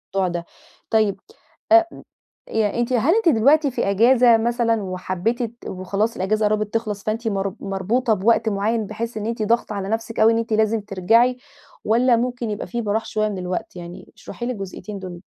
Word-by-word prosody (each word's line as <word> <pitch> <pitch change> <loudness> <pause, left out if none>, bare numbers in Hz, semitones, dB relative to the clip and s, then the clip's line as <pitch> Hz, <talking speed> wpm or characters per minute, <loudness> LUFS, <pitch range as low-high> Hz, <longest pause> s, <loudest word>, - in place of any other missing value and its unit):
الموضوع 190 -1 +2
ده 175 -1 -4 0.4
طيب 215 -3 +2 0.5
أ 335 0 +8
م - - -12 0.5
أنتِ 225 +3 0
هل 265 - +3
أنتِ 450 -6 +3
دلوقتي 280 +4 +4
في 215 - -1
إجازة 235 +3 +5
مثلًا 230 -1 +1
وحبّيتِ 185 +5 -2
ت 235 0 -6
وخلاص 195 +4 -2
الإجازة 215 +3 0
قرّبِت 210 0 0
تخلَص 215 -3 -2
فأنتِ 225 +2 -2
مر 195 -2 -2
مربوطة 210 +5 0
بوقت 220 +2 +2
معيّن 215 +2 0
بحيث 230 +2 -5
إن 210 - -4
أنتِ 230 -1 -2
ضاغطة 225 0 0
على 195 -1 -4
نفْسِك 225 +1 -3
أوي 220 +1 +6
إن - - +1
أنتِ 230 -1 -2
لازم 220 0 +2
ترجَعي، 225 +6 +2 0.5
والّا 240 +3 +4
ممكن 245 0 -2
يبقى 205 - -5
في 235 0 -3
براح 215 +1 -1
شوية 215 0 -1
من 200 - -5
الوقت؟ 180 0 -4
يعني 175 0 -10
اشرحي 240 - -7
لي 250 - -1
الجزئيّتين 200 0 -7
دُول. 180 -2 -8
220 Hz, 185 wpm, -22 LUFS, 200-235 Hz, 0.5 s, أ